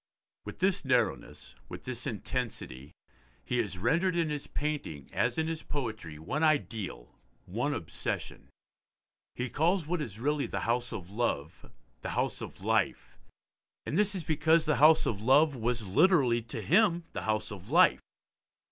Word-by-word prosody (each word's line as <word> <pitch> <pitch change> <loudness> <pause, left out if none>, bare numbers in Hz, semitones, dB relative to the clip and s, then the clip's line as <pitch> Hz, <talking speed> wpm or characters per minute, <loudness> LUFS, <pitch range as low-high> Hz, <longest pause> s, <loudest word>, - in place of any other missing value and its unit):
With - - -7
this 190 -1 +2
narrowness, 125 - -1 0.2
with - - -8
this 125 -1 -4
intensity, 105 - -4 0.5
he 125 - 0
has 100 -6 -2
rendered 165 - +1
in 165 -3 +1
his 145 -1 -4
painting 145 - -4
as 120 0 0
in 160 - +1
his 165 -1 -3
poetry 110 - -5
one 85 - -3
ideal, 105 - -1 0.3
one 120 +10 -1
obsession. 85 -1 -4 0.9
He 125 - -2
calls 165 +6 +1
what 175 +1 -1
is 110 -7 -6
really 145 +3 0
the - - -3
House 120 +1 0
of 95 -5 -7
Love 100 -9 -2 0.3
The - - -4
House - - -1
of - - -8
Life, - - 0 0.7
and - - -3
this 205 +1 +2
is 180 - -3
because 160 +1 +3
the 150 - +2
house 155 +2 +6
of 105 -3 -2
love 145 +5 +4
was 120 -1 -1
literally 130 - +4
to 110 -1 -6
him 175 -1 +3
the - - -4
house 110 +1 0
of 95 -3 -9
life. - - +5
125 Hz, 155 wpm, -30 LUFS, 110-155 Hz, 0.9 s, house